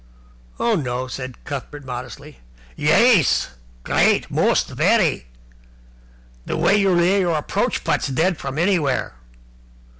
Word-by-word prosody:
"Oh, 235 - +1
no," 130 - -2
said 130 -1 -8
Cuthbert 140 +1 -7
modestly. 125 - -8 0.4
"Yais! 175 - +3 0.3
Great. - - +1
Most! - - +1
Very! 60 - +1 1.2
The - - -2
way 195 - +3
you 200 -2 +2
lay 180 +3 +3
your 175 -4 +1
approach 150 - -2
putts - - 0
dead 160 +6 0
from 135 +1 -6
anywhere!" 165 - 0
150 Hz, 115 wpm, -21 LUFS, 130-185 Hz, 1.2 s, Yais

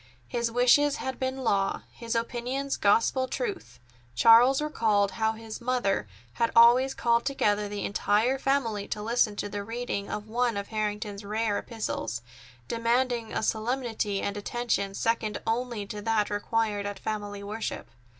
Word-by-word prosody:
His 235 -1 -1
wishes 250 +5 +4
had 265 -3 -4
been 260 0 -2
law, 200 -4 +1
his 235 -1 -4
opinions 250 +4 -2
gospel 230 +5 +2
truth. 410 - -4 0.4
Charles 235 - +7
recalled 220 -9 +1
how 220 0 0
his 225 +1 -8
mother 235 - 0 0.3
had 230 - 0
always 245 +3 +6
called 235 0 +2
together 210 -7 0
the 205 0 -4
entire 215 +6 +1
family 235 -7 0
to 210 - -4
listen 225 -1 +2
to 205 - -3
the 205 0 -5
reading 225 -2 -4
to - - -2
one 225 +2 -1
of 200 - -5
Harrington's 210 -1 -3
rare 210 0 -1
epistles, 120 - -4 0.4
demanding 235 0 0
a - - -2
solemnity 225 -3 -1
and 200 0 -2
attention 205 -2 -2
second 225 -1 0
only 235 -2 -1
to 210 +1 -6
that 215 -1 +1
required 205 0 -1
at 205 - -5
family 205 -2 -4
worship. 215 +2 -4
225 Hz, 150 wpm, -28 LUFS, 205-245 Hz, 0.4 s, Charles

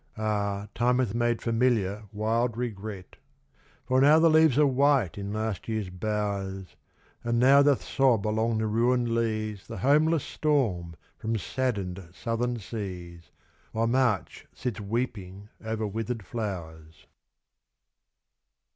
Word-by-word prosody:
Ah! 100 -2 -1
time 125 +1 +2
hath 125 -6 0
made 120 0 0
familiar 115 -4 +1
wild 115 +2 0
regret; 105 -5 -6 0.7
For 130 0 +2
now 145 +3 +7
the 165 0 +5
leaves 155 -4 +5
are 150 - +6
white 135 - +2
in 100 0 -5
last 110 -1 -3
year's 110 -5 -3
bowers, 95 -1 -3 0.5
And 120 0 0
now 135 +4 +6
doth 140 -2 +3
sob 125 -7 +2
along 110 +1 +1
the 110 - 0
ruined 120 +2 +1
leas 110 -3 -2
The - - -7
homeless 150 - +3
storm 105 - 0 0.2
from 115 0 -1
saddened 100 -6 -2
southern 120 +3 -2
seas, 90 -5 -7 0.4
While 115 +1 +1
March 120 -4 0
sits 125 -5 -4
weeping 105 -3 -4
over 110 0 -2
withered 110 +1 -4
flowers. 80 -8 -6
110 Hz, 125 wpm, -27 LUFS, 100-125 Hz, 0.7 s, now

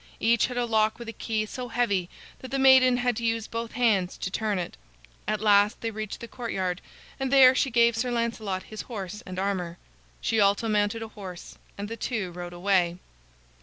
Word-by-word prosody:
Each 230 0 +3
had 250 0 -6
a 245 - +1
lock 220 -1 +2
with 235 - -9
a - - -6
key 215 -1 -2
so 250 +3 -6
heavy 205 -7 0 0.3
that 260 - -9
the 275 - -1
maiden 260 -2 +6
had 245 -1 0
to 235 - -4
use 225 -1 0
both 230 0 -5
hands 210 -7 +1
to 185 - -4
turn 210 -1 -1
it. 175 - -4 0.5
At 215 -1 -1
last 205 0 +4
they 230 - -2
reached 215 -1 -6
the 235 - -6
courtyard, 190 -8 -3 0.4
and 265 -1 -2
there 265 -2 +8
she 270 +1 +1
gave 235 -1 +4
Sir 245 +2 -1
Lancelot 230 -5 -2
his 215 - -7
horse 210 -3 -6
and 185 0 -7
armor. 185 -3 -2 0.4
She 225 - 0
also 200 +2 +3
mounted 210 +1 +1
a 225 - -8
horse, 190 -5 -10 0.2
and 200 +1 -4
the 230 +2 -6
two 215 -6 -3
rode 175 0 -7
away. 175 -1 +1
220 Hz, 205 wpm, -27 LUFS, 195-235 Hz, 0.5 s, there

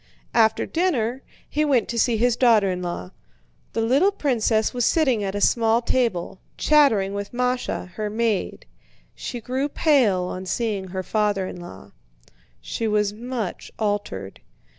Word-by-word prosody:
After 220 -1 +3
dinner, 265 -8 0 0.3
he 300 - 0
went 275 -6 +2
to 235 - -1
see 230 0 +2
his 240 +1 +2
daughter 225 -6 +4
in 180 0 -3
law. 175 - -5 0.6
The 225 - 0
little 275 - +3
princess 235 - +1
was 245 -1 -1
sitting 260 -7 +2
at 195 0 -3
a 205 - -2
small 230 0 +3
table, 230 -8 -1 0.2
chattering 225 -11 +3
with 200 0 -5
Másha, 250 -6 -1
her 210 +2 -4
maid. 220 -2 -1 0.5
She 245 - -6
grew 260 +5 -2
pale 250 - +3
on 185 +1 -5
seeing 200 -1 -2
her 185 +1 -4
father 205 -2 0
in 180 -1 -7
law. 95 - -11 0.7
She 225 - -3
was 210 -1 +1
much 235 -3 -5
altered. 205 - -3
225 Hz, 150 wpm, -23 LUFS, 200-250 Hz, 0.7 s, daughter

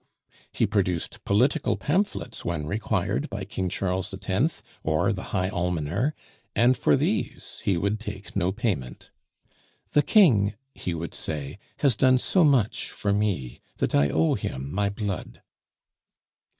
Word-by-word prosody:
He - - +1
produced 95 -5 -1
political 125 +9 +2
pamphlets 165 - -1
when 85 -3 -2
required 105 - -1
by 100 -1 -4
King 95 -3 -2
Charles 95 +1 -1
X. 100 - -1 0.2
or - - +2
the - - -6
High 95 0 -1
Almoner, 90 - -1 0.4
and 120 +4 +5
for - - +3
these - - -2
he 95 -3 +2
would 100 +4 0
take 105 -2 -8
no 95 -2 +1
payment. 95 - -3 0.8
"The 150 - +5
King," 115 - +5 0.2
he 90 - -3
would 85 +1 -5
say, 75 +3 -5 0.2
"has 140 -6 +4
done 130 +3 +5
so 180 +7 +3
much 135 -9 +2
for 100 -1 -1
me, 100 - -1 0.2
that - - -1
I 70 0 +4
owe 80 +4 +2
him 65 +2 -4
my 100 +1 +1
blood." 100 -2 -5
100 Hz, 140 wpm, -26 LUFS, 90-115 Hz, 0.8 s, and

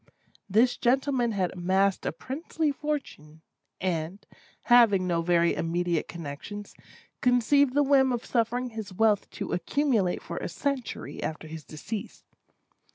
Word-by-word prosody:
This 230 +6 +3
gentlemen 250 -1 +1
had 185 -3 0
amassed 190 +2 +1
a - - +1
princely 310 +2 -2
fortune, 270 - -5 0.4
and, 180 +1 -3 0.4
having 230 -6 +5
no 170 -2 +1
very 170 0 +3
immediate 170 0 -1
connexions, 170 +6 -7 0.5
conceived 250 +2 +3
the 290 - +5
whim 270 -2 +4
of 240 0 -2
suffering 245 +1 0
his 220 -3 -6
wealth 210 +1 +2
to - - -5
accumulate 215 - 0
for 170 - -6
a - - -3
century 265 +6 -4
after 160 0 -4
his 160 0 -8
decease. 200 +9 -7
210 Hz, 130 wpm, -27 LUFS, 175-255 Hz, 0.5 s, having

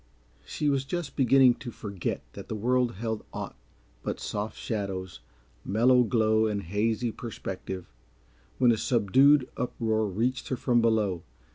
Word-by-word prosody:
She 150 - -2
was 140 -2 +2
just 170 +2 -4
beginning 130 -1 +5
to 125 - -6
forget 100 - -4
that - - -9
the - - -4
world 125 +2 +1
held 110 +2 -4
aught - - -6 0.5
but - - -4
soft 105 +1 -4
shadows, 95 - -4 0.4
mellow 125 +5 +4
glow 110 -2 +2
and 100 -2 -2
hazy 110 +6 0
perspective, 95 - -7 0.6
when 120 - +5
a 115 - +2
subdued 130 +6 +4
uproar 110 -3 0
reached 115 +7 -1
her 130 - -2
from 120 -1 +2
below. 105 -6 +1
115 Hz, 140 wpm, -28 LUFS, 105-125 Hz, 0.6 s, beginning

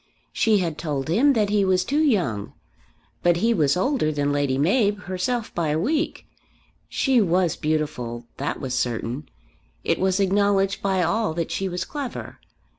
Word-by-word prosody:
She 220 -2 +3
had 170 -5 -2
told 145 -3 -3
him 260 - +4
that 210 -4 +1
he 205 -1 +3
was 185 -1 +2
too 290 +7 +1
young, 175 - 0 0.7
but 175 -1 +3
he 230 +6 +2
was 155 -5 +2
older 190 - +1
than 145 -1 0
Lady 145 -2 0
Mab 205 - +2
herself 190 +6 -2
by 170 -2 -1
a 150 +1 +1
week. 300 - -1 0.6
She 260 -4 +2
was 180 -3 +2
beautiful; 145 -7 -2
that - - -3
was 130 -2 -4
certain. 125 +3 -2 0.5
It - - 0
was 190 +1 +1
acknowledged 195 0 +2
by 190 -2 +1
all 200 0 0
that 170 -1 -2
she 195 0 -2
was 180 0 -3
clever. 280 -5 -6
185 Hz, 165 wpm, -24 LUFS, 150-210 Hz, 0.7 s, him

